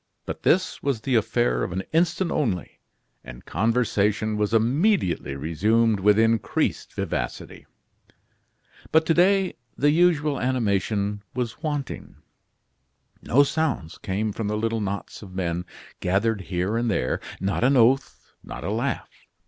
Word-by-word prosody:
But -, -, -6 dB
this 185 Hz, +2 st, +1 dB
was 135 Hz, -6 st, -1 dB
the 130 Hz, -, -2 dB
affair 60 Hz, -, +1 dB
of -, -, -3 dB
an 95 Hz, +2 st, -3 dB
instant 170 Hz, +2 st, +1 dB
only, 110 Hz, -, -2 dB, 0.4 s
and -, -, -11 dB
conversation 110 Hz, +1 st, +1 dB
was 105 Hz, 0 st, 0 dB
immediately 115 Hz, -, +1 dB
resumed 105 Hz, +9 st, +1 dB
with 105 Hz, +2 st, +4 dB
increased 115 Hz, -1 st, 0 dB
vivacity. -, -, -4 dB, 1.2 s
But 160 Hz, 0 st, +4 dB
to 165 Hz, -, +3 dB
day 190 Hz, +2 st, +3 dB, 0.2 s
the 145 Hz, +2 st, +3 dB
usual 155 Hz, -3 st, +2 dB
animation 105 Hz, -4 st, 0 dB
was 125 Hz, +1 st, -3 dB
wanting. 145 Hz, -4 st, -4 dB, 1.1 s
No 140 Hz, +5 st, +4 dB
sounds 145 Hz, -, -2 dB
came 105 Hz, +3 st, -2 dB
from 105 Hz, +1 st, -4 dB
the 105 Hz, +1 st, -1 dB
little 115 Hz, 0 st, -1 dB
knots 100 Hz, 0 st, -5 dB
of 95 Hz, -3 st, -11 dB
men 90 Hz, -1 st, -2 dB, 0.3 s
gathered 100 Hz, +3 st, +1 dB
here 95 Hz, +4 st, -1 dB
and 120 Hz, 0 st, 0 dB
there, 65 Hz, -11 st, 0 dB, 0.2 s
not 100 Hz, +4 st, -1 dB
an 135 Hz, +2 st, +4 dB
oath, 130 Hz, +4 st, +2 dB
not -, -, -8 dB
a -, -, -2 dB
laugh. -, -, -4 dB
115 Hz, 135 wpm, -24 LUFS, 100-140 Hz, 1.2 s, with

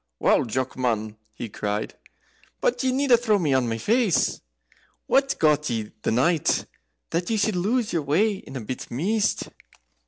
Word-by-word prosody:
"Wow, -, -, +3 dB
Jock, 130 Hz, +2 st, -2 dB
man!" 110 Hz, -4 st, -1 dB, 0.2 s
he 120 Hz, -, -6 dB
cried; 105 Hz, 0 st, -3 dB, 0.7 s
"but -, -, 0 dB
ye 260 Hz, -, +2 dB
needna 260 Hz, -2 st, +4 dB
throw 225 Hz, -3 st, +2 dB
me 155 Hz, -8 st, +1 dB
on 130 Hz, -3 st, +2 dB
my 115 Hz, -, -2 dB
face. 215 Hz, -, +1 dB, 0.6 s
What's 275 Hz, 0 st, +2 dB
got 150 Hz, -1 st, +2 dB
ye 110 Hz, -3 st, -3 dB
the -, -, -1 dB
night, 150 Hz, +8 st, +2 dB, 0.5 s
that 175 Hz, +1 st, -1 dB
you 225 Hz, -, +1 dB
should 210 Hz, -1 st, +1 dB
lose 215 Hz, +6 st, 0 dB
your 165 Hz, -, +1 dB
way 190 Hz, +9 st, +1 dB
in 135 Hz, -, -12 dB
a 130 Hz, -, -4 dB
bit 125 Hz, +4 st, -6 dB
mist?" 205 Hz, -, 0 dB
165 Hz, 165 wpm, -24 LUFS, -, 0.7 s, needna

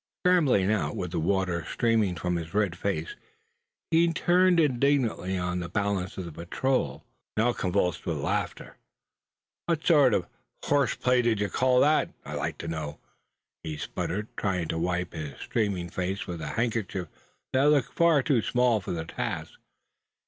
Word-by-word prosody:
Scrambling 140 Hz, -, +4 dB
out, 75 Hz, -9 st, 0 dB
with 90 Hz, -2 st, -4 dB
the 90 Hz, -, -1 dB
water 90 Hz, 0 st, 0 dB
streaming 110 Hz, -6 st, +2 dB
from 90 Hz, 0 st, -2 dB
his 85 Hz, +1 st, -5 dB
red 105 Hz, -5 st, +1 dB
face, 85 Hz, -3 st, -3 dB, 0.8 s
he 165 Hz, +1 st, +4 dB
turned 180 Hz, +2 st, +3 dB
indignantly 130 Hz, -, +1 dB
on 90 Hz, 0 st, -2 dB
the 85 Hz, -1 st, -5 dB
balance 100 Hz, -1 st, -1 dB
of 95 Hz, -, -4 dB
the 85 Hz, -, -7 dB
patrol, 85 Hz, -, -1 dB, 0.3 s
now 120 Hz, +3 st, +3 dB
convulsed 90 Hz, -4 st, -1 dB
with 80 Hz, -3 st, -1 dB
laughter. 70 Hz, -, -3 dB, 0.9 s
"What 165 Hz, -2 st, 0 dB
sort 145 Hz, -, +5 dB
of 90 Hz, -, 0 dB, 0.4 s
horse 140 Hz, -2 st, +2 dB
play 125 Hz, 0 st, +2 dB
d'ye 110 Hz, -4 st, +1 dB
call 125 Hz, +5 st, +3 dB
that 155 Hz, +1 st, +3 dB, 0.2 s
I'd 75 Hz, -, -6 dB
like 80 Hz, +2 st, -3 dB
to 85 Hz, -, -7 dB
know?" 80 Hz, -2 st, -4 dB, 0.6 s
he 80 Hz, -1 st, -5 dB
sputtered, 105 Hz, +7 st, -4 dB
trying 90 Hz, -5 st, -1 dB
to 80 Hz, -, -1 dB
wipe 90 Hz, +1 st, -1 dB
his 75 Hz, -4 st, -6 dB
streaming 95 Hz, -6 st, -2 dB
face 95 Hz, +2 st, -2 dB
with 85 Hz, -2 st, -6 dB
a -, -, -4 dB
handkerchief 110 Hz, -6 st, -2 dB, 0.5 s
that 130 Hz, +2 st, +3 dB
looked 145 Hz, -4 st, +2 dB
far 165 Hz, -5 st, +4 dB
too 130 Hz, -5 st, +2 dB
small 120 Hz, -1 st, +2 dB
for 90 Hz, -, -4 dB
the 80 Hz, -1 st, -3 dB
task. -, -, -4 dB
100 Hz, 160 wpm, -27 LUFS, 85-125 Hz, 0.9 s, sort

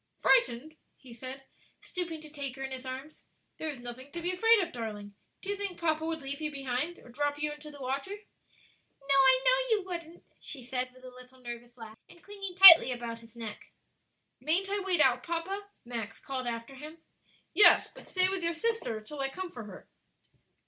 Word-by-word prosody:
"Frightened?" 315 Hz, -, +2 dB, 0.2 s
he 255 Hz, -3 st, -14 dB
said, 260 Hz, +3 st, -8 dB, 0.4 s
stooping 340 Hz, -3 st, -5 dB
to 310 Hz, -, -10 dB
take 280 Hz, -3 st, -5 dB
her 270 Hz, -, -7 dB
in 265 Hz, -, -5 dB
his 260 Hz, 0 st, -6 dB
arms; 265 Hz, +4 st, -8 dB, 0.3 s
"there 315 Hz, -, -4 dB
is 290 Hz, -, -5 dB
nothing 245 Hz, +3 st, -9 dB
to 345 Hz, -, -4 dB
be 355 Hz, -, +2 dB
afraid 450 Hz, +5 st, +4 dB
of, 350 Hz, -2 st, -3 dB
darling. 210 Hz, -5 st, -6 dB, 0.3 s
Do 395 Hz, -, -7 dB
you 405 Hz, -, 0 dB
think 400 Hz, -3 st, -4 dB
papa 315 Hz, -2 st, 0 dB
would 320 Hz, -2 st, -3 dB
leave 280 Hz, +2 st, -5 dB
you 305 Hz, -1 st, -2 dB
behind 275 Hz, +4 st, -3 dB
or -, -, -16 dB
drop 290 Hz, +3 st, -2 dB
you 300 Hz, 0 st, -1 dB
into 295 Hz, +1 st, -9 dB
the 290 Hz, -1 st, -12 dB
water?" 270 Hz, +5 st, -3 dB
"No; 390 Hz, -8 st, -7 dB
I 275 Hz, -, +6 dB
know -, -, +4 dB
you 405 Hz, -, -5 dB
wouldn't," 340 Hz, -2 st, -7 dB, 0.2 s
she 270 Hz, -5 st, -7 dB
said, 255 Hz, 0 st, -2 dB
with 255 Hz, 0 st, -17 dB
a 255 Hz, -, -9 dB
little 250 Hz, +1 st, -11 dB
nervous 240 Hz, 0 st, -9 dB
laugh, 225 Hz, -1 st, -11 dB
and 345 Hz, -, -17 dB
clinging 395 Hz, -3 st, -7 dB
tightly 350 Hz, -7 st, +11 dB
about 235 Hz, -2 st, -5 dB
his 230 Hz, 0 st, -17 dB
neck. 225 Hz, -3 st, -8 dB, 0.7 s
"Mayn't 345 Hz, +8 st, 0 dB
I 405 Hz, -, 0 dB
wade 375 Hz, -4 st, +1 dB
out, 255 Hz, -2 st, +4 dB
papa?" 345 Hz, +7 st, -4 dB, 0.2 s
Max 225 Hz, -2 st, -6 dB
called 260 Hz, -2 st, -5 dB
after 230 Hz, +2 st, -5 dB
him. 300 Hz, +4 st, -10 dB, 0.6 s
"Yes; 410 Hz, +5 st, +6 dB
but -, -, -14 dB
stay 370 Hz, 0 st, +4 dB
with 380 Hz, -1 st, -2 dB
your 335 Hz, 0 st, 0 dB
sister 390 Hz, -, -2 dB
till 285 Hz, +7 st, -9 dB
I 270 Hz, 0 st, 0 dB
come 365 Hz, +5 st, -6 dB
for 240 Hz, -3 st, -8 dB
her." 195 Hz, -3 st, -12 dB
285 Hz, 205 wpm, -30 LUFS, 250-350 Hz, 0.7 s, tightly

